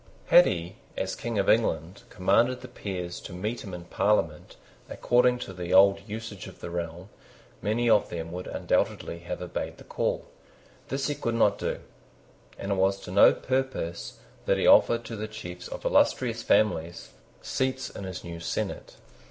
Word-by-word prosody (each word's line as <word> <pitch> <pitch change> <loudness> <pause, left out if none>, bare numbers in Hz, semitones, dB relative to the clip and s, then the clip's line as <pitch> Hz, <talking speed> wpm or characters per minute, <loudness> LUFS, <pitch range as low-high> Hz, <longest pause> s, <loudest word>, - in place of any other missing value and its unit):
Had - - +8
he, - - -3 0.2
as - - -2
King 115 -2 -4
of 100 - +1
England, 90 -5 +1
commanded 115 +7 +2
the 130 - -8
peers 90 -6 -5
to 95 - -9
meet 105 +7 -3
him 100 - -8
in 90 -1 -7
Parliament 85 -4 0 0.3
according 125 0 +3
to 105 -6 -7
the 90 0 -1
old 100 +1 +7
usage 105 -2 -6
of 95 - -12
the 85 - -7
realm, 85 +2 -5 0.5
many 115 +3 0
of 110 -3 +4
them 85 -1 -5
would 90 +1 -6
undoubtedly 85 - -1
have 90 +1 -5
obeyed 90 - -4
the - - -13
call. - - -2 0.6
This 135 0 -2
he 145 - 0
could 115 -5 -2
not 105 -3 +3
do; - - -3 0.8
and 100 - -4
it - - +2
was 95 +1 +2
to - - -8
no 100 - +7
purpose 130 -10 -3 0.3
that - - +3
he - - 0
offered 115 0 +5
to 115 - -6
the 110 0 -4
chiefs 90 -5 -8
of - - -8
illustrious 115 -3 +2
families 85 -7 +1 0.3
seats 130 0 -2
in - - -8
his 95 -1 -6
new 85 -1 -7
senate. 85 - -4
100 Hz, 175 wpm, -27 LUFS, 90-115 Hz, 0.8 s, Had